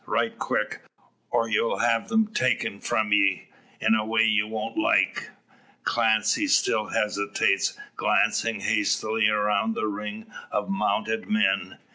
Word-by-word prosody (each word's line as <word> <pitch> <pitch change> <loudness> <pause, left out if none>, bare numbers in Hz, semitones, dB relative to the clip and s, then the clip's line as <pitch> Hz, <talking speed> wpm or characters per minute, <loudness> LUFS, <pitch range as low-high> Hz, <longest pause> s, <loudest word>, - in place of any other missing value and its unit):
Right - - 0
quick, - - -2 0.5
or 115 -1 +1
you'll 110 +1 0
have 115 -1 +1
them 220 -1 +1
taken 120 -5 0
from 110 -2 0
ye, 100 -2 +2 0.3
in - - +2
a 110 -1 +2
way 110 +1 +2
you 110 -1 +2
won't 110 - -5
like." 325 0 +1 0.5
Clancy 300 - +1
still 110 - +2
hesitates, 100 -1 0 0.2
glancing 115 -2 +1
hastily 110 +1 +1
around 105 +1 +1
the - - -2
ring 105 - -5 0.3
of - - -2
mounted 215 +3 -1
men. 215 +1 +1
110 Hz, 130 wpm, -25 LUFS, 105-120 Hz, 0.5 s, ye